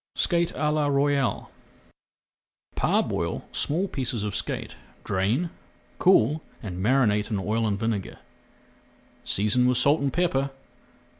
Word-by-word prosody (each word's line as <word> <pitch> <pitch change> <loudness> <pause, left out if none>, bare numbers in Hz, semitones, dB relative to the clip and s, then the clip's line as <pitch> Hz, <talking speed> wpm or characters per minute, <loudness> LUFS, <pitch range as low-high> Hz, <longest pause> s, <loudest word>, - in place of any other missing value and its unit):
SKATE 170 -1 +1
À 150 -1 0
LA 150 -1 +1
ROYALE 140 -1 +1 1.2
Parboil - - 0
small 175 +7 0
pieces 125 - -3
of 105 -1 -3
skate, 105 -3 -4 0.3
drain, 115 - 0 0.5
cool, 160 -4 +4 0.2
and 90 -3 -5
marinate 105 -4 +2
in 105 - -1
oil 110 +3 0
and 100 -2 0
vinegar, 110 -2 -3 1.1
seasoning 110 +5 +2
with 125 -1 +2
salt 140 +4 +4
and 140 -1 0
pepper. 140 -4 +1
125 Hz, 120 wpm, -26 LUFS, 105-150 Hz, 1.2 s, cool